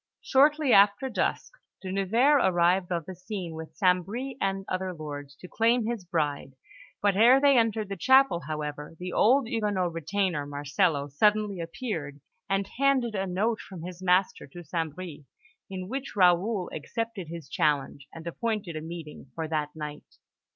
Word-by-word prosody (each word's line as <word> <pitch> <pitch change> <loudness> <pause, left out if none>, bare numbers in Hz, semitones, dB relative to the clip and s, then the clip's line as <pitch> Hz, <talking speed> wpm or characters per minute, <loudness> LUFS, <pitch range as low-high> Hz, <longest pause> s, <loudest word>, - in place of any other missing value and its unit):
Shortly 290 0 +4
after 205 +6 +5
dusk, 240 - -1 0.3
De 185 - -4
Nevers 230 +10 +3
arrived 180 0 +2
on 170 -2 -1
the 185 - -7
scene 185 -2 -6
with 160 0 -9
St. 180 -3 +3
Bris 250 +8 -5
and 195 0 -1
other 185 -1 -3
lords, 145 -2 -7
to 180 - -12
claim 230 +3 +2
his 230 -5 -3
bride; 145 -5 -2 0.5
but 200 -2 +3
ere 240 +6 +6
they 280 0 +5
entered 225 -3 +2
the 195 - -4
chapel, 260 -2 +4
however, 150 0 -5
the 180 +1 -6
old 255 +3 +4
Huguenot 205 -7 -1
retainer, 165 -2 -1
Marcello, 145 +1 0
suddenly 210 +6 +1
appeared, 165 - -5 0.3
and 195 0 0
handed 270 -4 +2
a 195 -1 -2
note 215 +5 0
from 180 -5 -10
his 180 0 -8
master 185 -2 +1
to 175 +5 -11
St. 160 -1 -3
Bris, 180 -5 -7 0.5
in 185 -1 -6
which 270 +5 -5
Raoul 185 +1 +3
accepted 225 +3 -4
his 165 -3 -8
challenge, 140 -1 -1
and 165 0 -10
appointed 205 -1 -3
a 155 - -4
meeting 160 -3 -8
for 160 -1 -3
that 150 -2 -1
night. 150 -1 -8
185 Hz, 165 wpm, -27 LUFS, 160-215 Hz, 0.5 s, ere